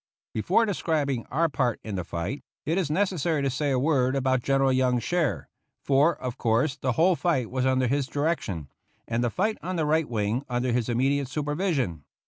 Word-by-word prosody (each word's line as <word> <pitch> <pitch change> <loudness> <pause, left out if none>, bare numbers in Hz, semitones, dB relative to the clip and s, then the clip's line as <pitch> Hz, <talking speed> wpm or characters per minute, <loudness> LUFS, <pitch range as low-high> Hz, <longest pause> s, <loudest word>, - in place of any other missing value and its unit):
Before 185 - +2
describing 150 - -1
our 165 +5 +1
part 125 -6 0
in 110 - -5
the 90 -2 -2
fight, 85 - -4 0.2
it 165 +5 +1
is 170 -6 -1
necessary 165 -3 0
to 135 - +1
say 145 +3 -1
a 135 - +2
word 130 -2 +2
about 130 -1 +1
General 135 0 +2
Young's 125 -2 +2
share, 175 -1 0 0.4
for, 145 +5 +3
of 130 -1 -6
course, 120 +5 +2
the 130 -4 -1
whole 175 +7 +4
fight 155 -10 0
was 130 0 0
under 130 0 +2
his 135 +2 0
direction, 125 - -2 0.4
and 115 +1 0
the 120 - +2
fight 210 - -1
on 185 +1 -3
the 160 -3 0
right 155 -1 +1
wing 110 +2 -1
under 125 0 0
his 120 -1 0
immediate 135 +3 +1
supervision. 145 - -1
135 Hz, 190 wpm, -26 LUFS, 125-160 Hz, 0.4 s, whole